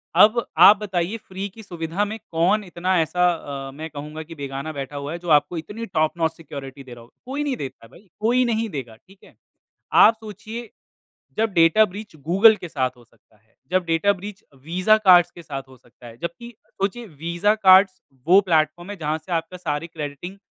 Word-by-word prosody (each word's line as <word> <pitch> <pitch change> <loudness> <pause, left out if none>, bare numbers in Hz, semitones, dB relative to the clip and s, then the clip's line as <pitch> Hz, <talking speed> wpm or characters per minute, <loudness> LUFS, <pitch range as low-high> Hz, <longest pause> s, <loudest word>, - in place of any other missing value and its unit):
अब 225 +3 +5
आप 205 - +9
बताइए 195 0 -2
फ्री 195 -2 -7
की 220 +3 -13
सुविधा 175 +2 -3
में 215 +2 -5
कौन 185 +6 +2
इतना 180 0 -1
ऐसा 180 +3 +1 0.4
अ, - - -8
मैं 155 +3 -8
कहूँगा 150 +2 -8
कि 165 +1 -12
बेगाना 140 +2 -5
बैठा 140 0 -6
हुआ 140 +1 -5
है, 170 - -5
जो 175 - -7
आपको 145 +4 -9
इतनी 205 +9 -6
टॉप 155 -3 -1
नॉच 160 -1 +1
सिक्योरिटी 140 -4 -9
दे 125 - -11
रहा 120 - -12
होगा। 120 - -20
कोई 275 +3 -3
नहीं 280 -3 -1
देता 130 -4 -8
है - - -18
भाई, 195 +1 -19
कोई 245 +4 +2
नहीं 225 -1 -1
देगा, 130 -8 -7
ठीक 190 - -23
है? - - -19 0.6
आप 220 - +7
सोचिए, 220 +2 -8 0.7
जब 220 -1 +1
डेटा 170 +5 +5
ब्रीच 205 -1 -8
गूगल 190 +9 +5
के 180 -3 -8
साथ 130 -5 -1
हो 120 - -19
सकता 110 -1 -31
है, 110 +2 -36 0.2
जब 185 0 +1
डेटा 165 +4 +2
ब्रीच 200 +1 -9 0.2
वीज़ा 185 +7 +3
कार्ड्स 180 -4 +6
के 170 - -13
साथ 135 -4 -6
हो 130 - -16
सकता 120 0 -18
है, 115 -1 -12
जबकि 170 +8 -6
सोचिए 205 +5 -4
वीज़ा 170 +5 -1
कार्ड्स 190 -2 +5 0.2
वो 185 +4 +7
प्लेटफ़ॉर्म 170 0 0
है, 205 - -6
जहाँ 155 -2 -2
से 175 +3 -10
आपका 165 +2 -2
सारी 165 -3 -3
क्रेडिटिंग 160 +3 -7
175 Hz, 205 wpm, -22 LUFS, 155-205 Hz, 0.7 s, आप